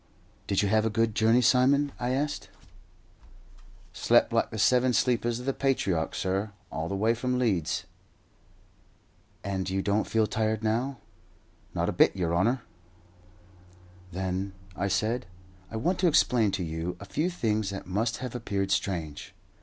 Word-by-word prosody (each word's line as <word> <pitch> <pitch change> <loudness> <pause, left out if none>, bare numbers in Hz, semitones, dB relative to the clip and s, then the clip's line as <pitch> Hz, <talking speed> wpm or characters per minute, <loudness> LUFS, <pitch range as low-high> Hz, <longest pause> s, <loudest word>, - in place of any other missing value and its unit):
"Did 100 +1 +1
you - - +2
have 110 +2 +3
a 110 - +1
good 110 0 +1
journey, 115 +3 +4
Simon?" 135 +4 +4
I 120 - -1
asked. 145 +3 -2 1.4
"Slept - - +3
like - - +2
the - - -6
seven 125 0 +3
sleepers 120 -1 +1
of 125 - -8
the 135 - 0
patriarch, 100 -13 0
sur, 95 +3 -1 0.2
all 80 +1 -3
the 100 - -2
way 110 +4 +2
from 125 +2 -1
Leeds." 100 -11 0 1.6
"And 95 -2 -2
you 95 0 -1
don't 105 +1 +1
feel 110 -1 +2
tired 110 0 -1
now?" 120 +5 0 0.8
"Not - - 0
a - - +1
bit, - - +4
yer 85 -3 -1
honour." 115 +8 +1 1.5
"Then," 95 +1 -3 0.2
I 95 - -1
said, 110 +4 0 0.4
"I - - -8
want 170 +12 0
to 180 - +3
explain 125 -8 +4
to 95 -1 -1
you 80 +2 -4
a - - -9
few 165 +4 -1
things 110 - -1
that 100 -1 -6
must 110 +6 -1
have 125 - -6
appeared 100 -5 -2
strange." 85 0 -2
110 Hz, 155 wpm, -28 LUFS, 95-125 Hz, 1.6 s, journey